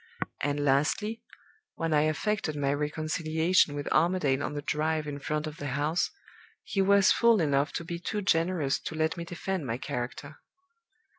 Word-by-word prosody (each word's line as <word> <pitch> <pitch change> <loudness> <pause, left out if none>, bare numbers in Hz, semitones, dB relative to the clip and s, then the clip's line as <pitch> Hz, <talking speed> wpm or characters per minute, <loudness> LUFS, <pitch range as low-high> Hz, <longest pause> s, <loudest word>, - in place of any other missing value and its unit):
And 145 +1 0
lastly, 155 +11 +1 0.5
when 165 -1 -1
I 150 - +4
affected 175 -1 -1
my 140 -1 0
reconciliation 155 +2 +1
with 145 0 -4
Armadale 155 -6 +2
on 145 - -3
the 145 - -4
drive 155 +1 0
in 145 -1 -5
front 150 +2 -2
of 155 0 -6
the 145 - -5
house, 155 +4 +1 0.5
he 195 - -1
was 200 0 +5
fool 235 -2 +4
enough 145 -2 +1
to - - -3
be 170 0 -4
too 210 +3 -3
generous 165 -5 +1
to 160 - -6
let 160 0 0
me 170 -1 -5
defend 175 -2 -3
my 115 0 -2
character. 130 +4 -5
155 Hz, 165 wpm, -29 LUFS, 145-175 Hz, 0.5 s, was